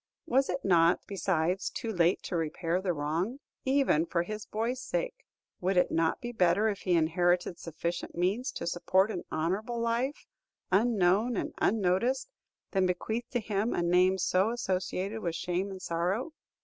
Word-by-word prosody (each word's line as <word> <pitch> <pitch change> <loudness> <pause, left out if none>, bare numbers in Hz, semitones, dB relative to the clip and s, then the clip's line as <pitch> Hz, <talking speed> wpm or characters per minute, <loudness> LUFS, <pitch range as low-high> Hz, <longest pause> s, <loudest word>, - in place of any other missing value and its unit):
Was 270 -3 +2
it - - -3
not, 170 -2 +4
besides, 185 -1 0
too 225 - -4
late 175 -2 +2
to 180 - -4
repair 165 +2 -1
the 190 -2 0
wrong? 165 - -2 0.3
Even 260 - +3
for 170 0 0
his 215 +3 -6
boy's 235 +4 -2
sake, - - -3 0.3
would 185 +1 0
it 180 - +3
not 165 0 +1
be 240 - -5
better 205 0 +3
if 200 -2 -3
he 180 -3 +1
inherited 175 +2 +2
sufficient 170 +1 -4
means 195 +9 0
to - - -5
support 185 +4 +2
an 180 - -4
honorable 200 +9 -1
life, 235 +5 -1 0.5
unknown 210 +1 +3
and - - -3
unnoticed, 225 - +1 0.4
than 190 -2 +2
bequeath 220 +6 -2
to 245 - 0
him 215 0 -1
a 175 - 0
name 180 +2 +4
so 185 +2 +2
associated 195 -2 -2
with 170 -5 -3
shame 180 +2 -2
and 190 -1 -8
sorrow? 180 - -1
190 Hz, 160 wpm, -30 LUFS, 175-225 Hz, 0.5 s, not